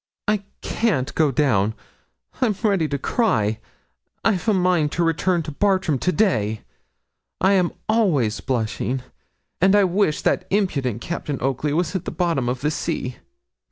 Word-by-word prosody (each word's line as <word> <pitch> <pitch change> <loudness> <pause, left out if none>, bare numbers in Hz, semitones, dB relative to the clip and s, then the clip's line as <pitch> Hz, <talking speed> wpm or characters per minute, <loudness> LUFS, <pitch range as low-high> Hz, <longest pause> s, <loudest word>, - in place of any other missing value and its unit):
'I 210 -1 +2 0.2
can't 175 - 0
go 155 -2 +3
down 115 -7 +1 0.7
I'm 225 -5 +2
ready 195 -7 +2
to 140 - -2
cry 110 - +1 0.7
I've 215 -1 +1
a - - +4
mind 180 -5 +2
to 175 - +1
return 170 +1 +1
to 155 - -6
Bartram 185 -4 +1
to 180 - +1
day; 110 - +1 0.8
I 190 +1 +4
am 180 -3 +2 0.2
always 150 - +2
blushing; 125 +2 -2 0.6
and 190 +2 +5
I 205 - +5
wish 185 -4 +1
that 185 - +1
impudent 140 - 0
Captain 150 -1 -4
Oakley 135 +3 -1
was 170 +4 0
at 185 - -2
the - - -2
bottom 165 -9 0
of 125 0 -3
the 150 +2 +1
sea.' 125 -4 -3
160 Hz, 155 wpm, -22 LUFS, 130-190 Hz, 0.8 s, and